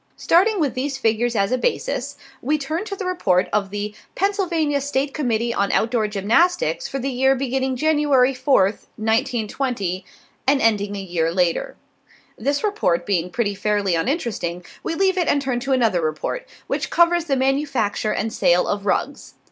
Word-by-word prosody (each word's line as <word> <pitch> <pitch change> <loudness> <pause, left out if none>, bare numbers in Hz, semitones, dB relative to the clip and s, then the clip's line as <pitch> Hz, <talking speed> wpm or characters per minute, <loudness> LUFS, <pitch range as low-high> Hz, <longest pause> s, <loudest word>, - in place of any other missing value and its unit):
Starting 390 +5 +3
with 290 -6 +1
these 270 +2 -2
figures 230 -1 +1
as 200 +1 +1
a 255 - +1
basis, - - -2 0.2
we 300 +4 +1
turn 310 +5 -3
to 415 -2 -5
the 390 - -5
report 195 - +1
of 200 -2 +1
the 205 +1 -4 0.2
Pennsylvania 340 -8 0
State 275 0 -1
Committee 235 -5 0
on 200 -2 0
Outdoor 225 -1 +1
Gymnastics 340 - +1
for 275 - -4
the 270 +1 -2
year 265 +2 +3
beginning 265 0 -1
January 290 -2 +3
4th, 250 -6 +1
1920, 225 -3 -1 0.4
and 275 0 +4
ending 205 -4 +1
a - - -4
year 175 -4 -1
later. 180 - 0 0.6
This 280 +5 -1
report 400 - 0
being 180 -3 0
pretty 205 +1 -1
fairly 205 -2 0
uninteresting, 180 - -2 0.2
we 330 - -3
leave 380 +1 +2
it 345 - +1
and 285 - +3
turn 260 -3 -1
to 270 +2 -4
another 225 -9 +2
report, 155 - -3 0.2
which - - -2
covers 345 0 +3
the 280 -4 +1
manufacture 265 -6 0
and 220 +1 -2
sale 175 +1 +3
of 205 0 -2
rugs. - - -2
255 Hz, 165 wpm, -21 LUFS, 205-290 Hz, 0.6 s, and